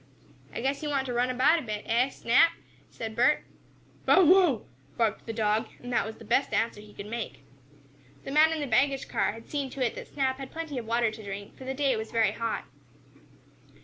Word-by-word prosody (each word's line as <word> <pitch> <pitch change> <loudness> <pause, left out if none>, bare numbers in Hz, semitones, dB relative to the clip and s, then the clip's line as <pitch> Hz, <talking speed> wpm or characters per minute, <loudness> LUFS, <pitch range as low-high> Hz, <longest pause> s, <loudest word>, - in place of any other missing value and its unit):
"I - - -5
guess 275 +4 -1
you 300 - -3
want 275 -2 0
to 250 - -3
run 245 +1 +1
about 265 +7 +4
a - - -5
bit, 215 -5 -5
eh, 240 +4 +2
Snap?" 270 +7 +4 0.4
said 220 -1 -6
Bert. 250 +5 +3 0.6
"Bow 375 - +7
wow!" 345 - +5 0.3
barked 225 -1 0
the - - -2
dog, 220 -1 +1
and 245 0 -7
that 205 - +1
was 220 - -7
the - - -13
best 275 - +1
answer 225 -2 0
he 210 0 -14
could 200 - -7
make. 230 +1 -6 0.8
The - - -6
man 310 +2 +5
in 320 -1 -2
the - - -1
baggage 270 +2 +2
car - - 0
had 225 +1 -12
seen 280 -3 -2
to 260 -1 -1
it 230 - -1
that - - -8
Snap 265 -2 -1
had 270 -1 -6
plenty 320 -5 -4
of 225 - -8
water 230 -1 +2
to 220 0 -10
drink, 200 0 -7
for 260 - -11
the 265 +1 -3
day 275 -2 +2
was 220 0 -5
very 225 -3 +2
hot. 230 +1 -3
245 Hz, 220 wpm, -28 LUFS, 225-275 Hz, 0.8 s, Bow